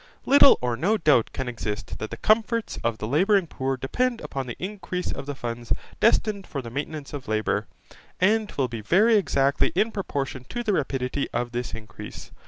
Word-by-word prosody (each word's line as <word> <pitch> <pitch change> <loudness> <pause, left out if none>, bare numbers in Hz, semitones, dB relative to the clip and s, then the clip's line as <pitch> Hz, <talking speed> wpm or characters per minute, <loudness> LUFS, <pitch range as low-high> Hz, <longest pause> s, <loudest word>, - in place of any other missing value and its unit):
Little 280 0 +8
or 120 -1 +1
no 195 - +2
doubt 150 - +3
can 130 - -4
exist 115 -2 -4
that 110 - -4
the 115 - -6
comforts 225 - +1
of 115 -1 0
the 105 - -4
labouring 190 - +3
poor 135 -4 -2
depend 240 - 0
upon 135 -2 -4
the 120 - -5
increase 185 -2 -4
of 140 - -6
the 145 - -3
funds 120 -2 -6 0.3
destined 215 -3 +2
for 140 - -4
the 115 - -8
maintenance 145 +2 -5
of 140 -3 -6
labour, 110 -1 0 0.5
and 215 +3 +2
will 135 -2 0
be 115 -2 -6
very 210 - +4
exactly 140 -9 +2
in 215 +5 +2
proportion 140 - -3
to 240 - -3
the 215 -3 +1
rapidity 135 -3 -1
of 120 0 -2
this 120 -2 -3
increase. 110 -1 -10
140 Hz, 190 wpm, -25 LUFS, 120-205 Hz, 0.5 s, Little